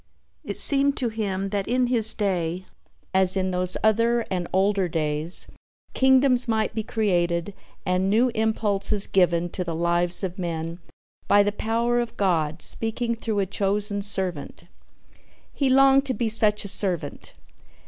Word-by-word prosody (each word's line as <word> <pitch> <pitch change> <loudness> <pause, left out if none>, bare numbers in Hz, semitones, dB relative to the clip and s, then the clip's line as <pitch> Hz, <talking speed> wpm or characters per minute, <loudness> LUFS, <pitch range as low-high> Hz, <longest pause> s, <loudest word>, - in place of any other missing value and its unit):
It - - -5
seemed 280 0 +3
to 245 - -1
him 195 -3 -3
that 200 -1 -3
in 250 +1 +1
his 230 -3 +2
day 185 -3 -2 0.5
as 190 0 +3
in 190 0 -1
those 180 0 -1
other 230 +2 +2
and 180 -2 -2
older 195 0 +1
days, 155 +1 +1 0.5
kingdoms 265 -1 +3
might 220 -1 0
be 220 - -2
created 175 -4 -1 0.3
and 185 +1 0
new 230 +5 +3
impulses 215 -2 0
given 175 -2 +1
to 180 - -4
the 170 -2 -4
lives 175 +2 0
of 185 0 -4
men 165 -1 -4 0.5
by 205 0 +5
the 205 - 0
power 230 +3 -1
of 240 -1 -4
God 165 -5 0
speaking 230 +1 -3
through 225 -2 -4
a 200 - +1
chosen 200 +1 -1
servant. 190 -6 -4 0.9
He 275 -2 0
longed 270 +1 +4
to 260 - -1
be 225 +1 -1
such 210 -1 +1
a - - -4
servant. 180 -7 -1
200 Hz, 150 wpm, -24 LUFS, 180-225 Hz, 0.9 s, by